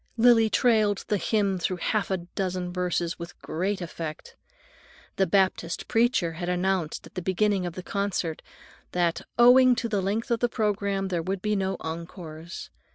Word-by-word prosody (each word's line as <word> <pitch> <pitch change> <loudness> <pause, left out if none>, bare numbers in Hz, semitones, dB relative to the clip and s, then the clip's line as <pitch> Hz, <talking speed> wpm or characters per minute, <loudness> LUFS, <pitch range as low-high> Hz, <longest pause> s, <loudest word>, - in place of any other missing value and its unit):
Lily 225 -1 +6
trailed 215 -4 +2
the 210 - +2
hymn 200 -2 +1
through 180 +1 -1
half 205 +3 -1
a 190 - +1
dozen 180 0 -4
verses 180 -1 -1
with 170 0 -9
great 190 +4 -2
effect. 165 -2 -6 0.8
The 190 - +3
Baptist 185 -2 +1
preacher 225 -7 +2
had 175 +2 -4
announced 180 -2 -1
at - - -14
the 185 - -4
beginning 190 +1 +1
of 175 - -5
the 185 - -7
concert 195 -6 -2 0.5
that 175 -2 +1 0.2
"owing 250 +1 +7
to 235 -1 -2
the 210 -3 0
length 210 +5 -2
of 235 - +2
the 245 - +1
programme, 200 -3 -1
there 175 -2 -1
would 190 +2 -3
be 210 0 +1
no 190 -1 -1
encores." 165 0 -7
190 Hz, 165 wpm, -26 LUFS, 175-210 Hz, 0.8 s, owing